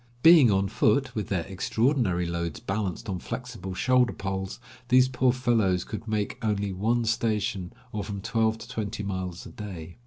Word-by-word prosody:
Being 160 -7 +8
on 100 -1 +2
foot, 125 +6 +2
with 105 -4 -3
their 90 -4 -1
extraordinary 100 -1 +1
loads 85 -2 -3
balanced 95 -1 -3
on 95 -3 -2
flexible 110 -5 -6
shoulder 125 +3 +3
poles, 95 0 -4 0.3
these 130 +1 +5
poor 130 0 +2
fellows 115 -8 +1
could 110 +1 -7
make 110 +3 -2
only 100 -2 0
one 115 +5 +1
station, 105 -5 -1 0.2
or 105 -4 -3
from 100 0 -5
twelve 110 +2 +1
to - - -10
twenty 110 -3 -4
miles 95 -3 -4
a - - -8
day. 90 -5 -8
105 Hz, 165 wpm, -27 LUFS, 95-120 Hz, 0.3 s, Being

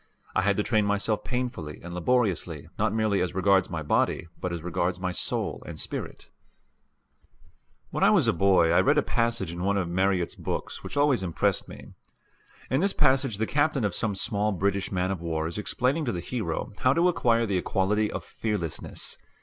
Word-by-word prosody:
I - - +2
had 100 0 +1
to 105 - +2
train 110 -2 +2
myself 105 +1 0
painfully 120 - -4
and 85 0 -7
laboriously 90 - 0
not - - +2
merely 110 -3 +1
as 90 0 -2
regards 95 -1 +3
my 80 -2 -4
body 75 - +1
but 90 - -3
as 85 -2 -4
regards 90 +1 -1
my 90 0 -1
soul - - -2
and - - -7
spirit. - - -6 1.6
When - - -1
a - - +5
boy 90 -2 +4
I 85 - +5
read 145 +3 +3
a - - +4
passage 115 -7 0
in 85 +1 -6
one 100 +1 +1
of 95 -3 0
Marryat's 90 0 +1
books - - -5
which - - -6
always 145 -5 +3
impressed 90 -3 0
me. - - -11 0.8
In 130 - +3
this 195 +1 +2
passage 130 -5 +2
the 110 - 0
captain 145 0 +1
of 100 - -1
some 105 0 -1
small 105 +1 0
British 100 0 -1
man 95 0 0
of 95 -4 -4
war 80 -2 -2
is 85 +5 -4
explaining 130 +8 0
to 120 - 0
the 90 - -3
hero 95 -4 -3
how 130 - +4
to 170 +4 +3
acquire 115 -9 +2
the 95 -4 0
quality 105 +4 +1
of - - -4
fearlessness. 105 -8 -3
100 Hz, 190 wpm, -27 LUFS, 90-115 Hz, 1.6 s, a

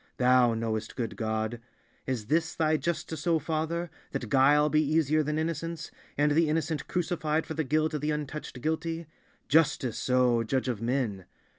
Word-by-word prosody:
Thou 125 -2 +4
knowest, 110 -1 -3
good 115 -3 -3
God! 110 +1 -2 0.5
Is 125 -5 -2
this 160 +7 0
Thy 155 -1 +2
justice, 160 -1 -3
O 165 -1 +4
Father, 160 +2 -2 0.2
that 130 -5 -3
guile 145 +4 +5
be 155 +1 +3
easier 155 0 +2
than 150 +1 -1
innocence, 165 +1 -3 0.3
and 150 +1 +3
the 160 +1 +3
innocent 160 0 -1
crucified 160 -3 -1
for - - -5
the 160 0 -1
guilt 155 +3 +1
of 150 - -2
the 150 - -1
untouched 150 -3 -4
guilty? 165 +2 -2 0.4
Justice, 145 -6 +2
O 125 -2 +4
judge 130 +3 -1
of 120 -4 -2
men! 115 -6 -1
150 Hz, 165 wpm, -29 LUFS, 125-160 Hz, 0.5 s, guile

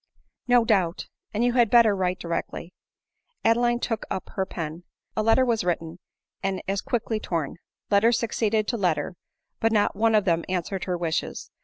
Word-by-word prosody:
" - - -52
No 240 -2 +5
doubt; 190 -6 +1 0.3
and 215 +3 0
you 245 0 +2
had 240 -3 +4
better 230 -3 +6
write 185 -1 0
directly." 170 0 -4 0.7
Adeline 240 +1 +3
took 225 -2 -2
up 190 - -4
her 190 -1 -2
pen. 165 0 -5 0.3
A 215 - +1
letter 225 +4 +4
was 230 -4 +1
written 170 -1 -2 0.2
— - - -63
and 195 -1 -1
as 195 0 0
quickly 225 -2 -1
torn. 165 -8 -3 0.3
Letter 205 +3 +5
succeeded 220 -2 0
to 235 - -1
letter; 180 -2 0 0.4
but 225 -1 +2
not 210 -2 +2
one 220 +2 +3
of 210 -2 +3
them 170 -2 +2
answered 185 +1 -2
her 180 -1 -1
wishes. 165 -2 -3
200 Hz, 180 wpm, -25 LUFS, 180-225 Hz, 0.7 s, better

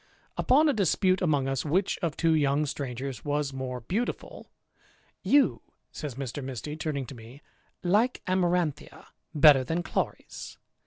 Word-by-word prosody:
Upon 295 +5 +4
a 295 - +3
dispute 190 -2 +2
among 145 -6 +1
us, 135 -1 -1
which 185 +6 0
of 165 -4 -2
two 165 -1 +3
young 145 -1 +2
strangers 130 -3 -5
was 145 -1 -1
more 130 -2 -5
beauti 205 - -1
ful, - - -13 0.7
"You," 285 -1 +3 0.3
says 145 -5 -6
Mr. 135 +1 -5
Misty, 135 +3 -5
turning 155 -4 -3
to 130 - -9
me, 120 +4 -13 0.4
"like 210 +8 +2
Amar 180 -1 +2
anthia 160 -5 -4 0.3
better 145 -3 +7
than 165 +7 -2
Chloris. - - -4
150 Hz, 150 wpm, -28 LUFS, 135-180 Hz, 0.7 s, better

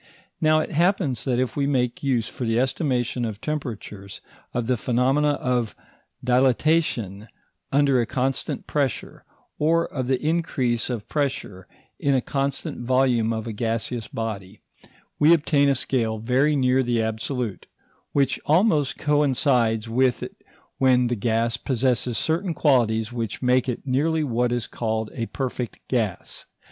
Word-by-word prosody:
Now 155 0 +4
it - - -5
happens 170 - +1
that 125 -3 +1
if 125 -2 -1
we 140 -1 0
make 125 -4 0
use 125 -5 0
for - - -6
the 115 0 +1
estimation 130 -2 0
of 110 -3 -4
temperatures, 110 -8 -5 0.3
of 120 -1 -2
the 125 +2 +1
phenomena 130 +5 +2
of 125 -5 -1 0.5
dilatation 125 - +1 0.4
under 140 -2 +3
a 115 - -2
constant 130 +1 -2
pressure, 140 -4 -2 0.3
or 165 +2 +3
of 130 -3 -2
the 130 -1 +1
increase 145 -8 0
of 115 -4 -4
pressure 130 -10 -3 0.3
in 140 -1 +2
a - - +4
constant 140 +1 -3
volume 125 -3 +2
of 110 -1 -3
a 115 - -4
gaseous 115 +1 -2
body, 105 -3 -5 0.6
we 160 +3 +7
obtain 145 -2 +2
a 140 - +3
scale 115 -3 -1
very 130 +7 +2
near 130 -1 +3
the 120 -2 0
absolute, 110 0 -3 0.4
which 140 -2 +1
almost 155 - +3
coincides 130 -6 +2
with 125 +2 +1
it - - -9 0.4
when 130 -2 +4
the - - 0
gas 115 +1 0
possesses 125 -2 0
certain 170 +2 -1
qualities 120 -5 +2
which 115 0 -4
make 125 +1 +3
it 125 - -4
nearly 155 +5 +1
what 120 -3 0
is 120 -1 -1
called 110 -1 -3
a 115 -2 -3
perfect 125 -3 -4
gas. 110 -7 -2
125 Hz, 145 wpm, -24 LUFS, 115-140 Hz, 0.6 s, we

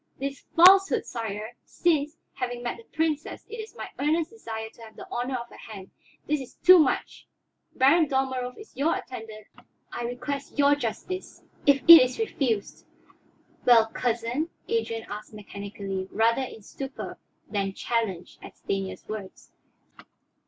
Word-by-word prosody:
"This 275 +1 -5
falsehood, 380 +3 +7
sire 220 -1 -5
since, 310 -2 0 0.2
having 245 -1 -4
met 240 - -3
the 230 - -13
Princess, 315 -2 -2
it 460 - -8
is 440 0 -8
my - - -6
earnest 315 +4 +1
desire 220 - -7
to - - -19
have 220 -1 -12
the - - -10
honor 250 +2 -2
of 240 0 -7
her - - -14
hand 200 -4 -10 0.3
this 300 -1 0
is 260 - -11
too 370 0 +7
much. 295 -5 0 0.5
Baron 300 +5 +5
Dalmorov 260 -2 -1
is 425 - -13
your 290 +6 +1
attendant; 220 -3 -8 0.5
I 240 - -4
request 275 +5 -5
your 285 0 +5
justice. 290 - -4 0.2
If 280 -1 +5
it 335 -3 +13
is 255 0 -2
refused 255 - -2 0.4
" - - -34
"Well, 225 -2 +6
cousin?" 240 +6 -1 0.2
Adrian 230 - -1
asked 210 +1 -8
mechanically, 200 -2 -6
rather 230 +4 +2
in 235 -4 -7
stupor 270 +5 -7 0.3
than 195 -2 -2
challenge 215 -7 -2
at - - -12
Stanief's 195 -1 -4
words. 210 -3 -8
250 Hz, 150 wpm, -26 LUFS, 220-295 Hz, 0.5 s, it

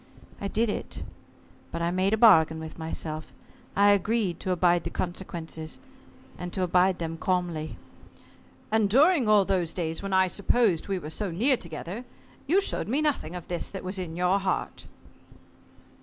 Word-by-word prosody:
I 200 - -1
did 225 +3 +1
it, 205 - -4 0.7
but 170 - -3
I 170 - +1
made 185 +2 +1
a 220 - +2
bargain 160 -8 +6
with 160 +1 -8
myself, 155 -1 -5 0.4
I 205 +1 +6
agreed 205 -2 +1
to 190 - -4
abide 175 -1 +3
the 170 - -3
consequences 170 -3 -5 0.6
and 180 0 -5
to 185 - -1
abide 180 +1 +3
them 165 -1 -4
calmly." 175 -4 -1 0.9
"And 220 -2 +3
during 275 - +4
all 210 -2 +5
those 180 -4 0
days 165 -2 -2
when 195 0 -4
I 190 0 +5
supposed 200 0 +1
we 195 -1 -1
were 155 -3 -6
so 205 +4 -2
near 235 +11 +2
together 170 +4 -7 0.4
you 365 +7 +4
showed - - -2
me 260 +7 +1
nothing 250 - -1
of 175 - -7
this 175 -1 -2
that 195 - -7
was 185 +1 -3
in 170 -3 -5
your 180 +3 +2
heart." 190 -1 -3
185 Hz, 170 wpm, -27 LUFS, 170-205 Hz, 0.9 s, bargain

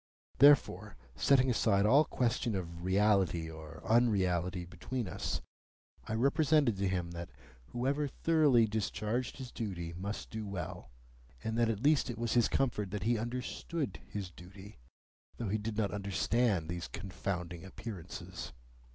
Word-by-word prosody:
Therefore, 145 +1 +5 0.2
setting 130 - +4
aside 100 -4 +3
all 140 +8 +6
question 115 -4 0
of 85 -2 -5
reality 95 -3 +2
or 80 0 -10
unreality 95 -6 +2
between 95 +8 -4
us, - - -3 0.7
I 110 - -1
represented 140 0 +3
to 95 0 0
him 90 -2 -1
that 85 0 -6 0.4
whoever 140 +4 0
thoroughly 145 -5 +4
discharged 110 +3 -2
his 130 -3 -7
duty 85 -7 -4
must 100 +4 -5
do 110 0 -4
well, 90 -2 -5 0.5
and 110 0 -2
that 115 -1 +3
at 110 +1 -2
least 145 -2 +4
it 120 - -4
was 115 0 -1
his 120 -2 +4
comfort 115 -7 0
that 105 +2 -4
he 115 0 +2
understood 125 - -3
his 100 -4 -5
duty, 95 0 -13 0.6
though 115 -4 -3
he 110 +2 0
did 105 0 -4
not 105 -3 +1
understand 100 -1 +1
these 85 +1 -4
confounding 90 -3 -4
Appearances. 95 - -7
105 Hz, 145 wpm, -33 LUFS, 90-120 Hz, 0.7 s, all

